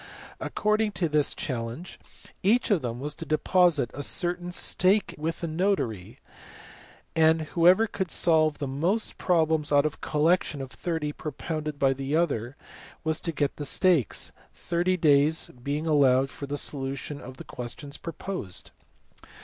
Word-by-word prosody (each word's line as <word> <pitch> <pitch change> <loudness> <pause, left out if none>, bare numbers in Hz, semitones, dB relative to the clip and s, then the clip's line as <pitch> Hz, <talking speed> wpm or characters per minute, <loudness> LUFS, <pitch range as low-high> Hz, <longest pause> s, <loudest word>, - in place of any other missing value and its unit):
According 215 0 0
to 175 - 0
this 150 -2 +1
challenge 120 +6 -5 0.4
each 230 +5 +2
of 190 -6 +3
them 120 -1 -4
was 145 +2 -2
to - - -8
deposit 155 - +2
a 145 - -5
certain 175 +3 0
stake 190 +3 +2
with 160 +3 -4
a - - 0
notary, 160 - -1 1.0
and 160 0 +4
whoever 180 +7 +4
could 190 -4 -3
solve 155 -2 +2
the 145 - -3
most 170 +12 -1
problems 160 -4 +2
out 145 0 +4
of 155 - 0
a - - -16
collection 155 0 +1
of 135 -1 -6
thirty 160 -4 -3
propounded 155 0 -5
by 135 -1 +3
the 135 +2 -2
other 140 -7 0 0.5
was 160 0 +1
to 165 - -2
get 145 -2 -1
the 150 - -4
stakes, 165 - +2 0.2
thirty 175 +2 0
days 150 -1 +3
being 145 +4 -2
allowed 135 -3 +4
for 140 - -7
the 145 +1 -3
solution 140 +1 -3
of 130 +1 -10
the - - -8
questions 135 +4 -7
proposed. 165 - -6
155 Hz, 150 wpm, -27 LUFS, 140-175 Hz, 1.0 s, and